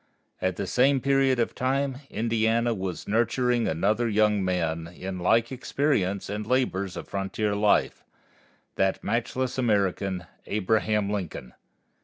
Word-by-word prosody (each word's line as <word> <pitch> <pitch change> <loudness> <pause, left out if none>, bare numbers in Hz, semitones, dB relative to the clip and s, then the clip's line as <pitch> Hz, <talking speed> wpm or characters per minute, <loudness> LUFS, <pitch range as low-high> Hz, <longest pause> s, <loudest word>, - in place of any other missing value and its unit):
At 95 -1 0
the 100 - -3
same 135 +7 +3
period 135 -1 +2
of 115 - 0
time 135 +1 -1
Indiana 115 +1 +1
was 95 -4 -5
nurturing 120 +2 +1
another 105 +8 +1
young 105 -1 +2
man 85 -3 -1
in 95 +2 -6
like 115 +7 +2
experience 125 -7 0
and 105 +1 -3
labors 100 -8 0
of - - -7
frontier 100 +2 -2
life 105 0 +2 0.7
that 95 0 +1
matchless 125 +2 -1
American, 100 -5 0 0.2
Abraham 105 0 +1
Lincoln. 80 -11 -5
105 Hz, 125 wpm, -26 LUFS, 95-120 Hz, 0.7 s, same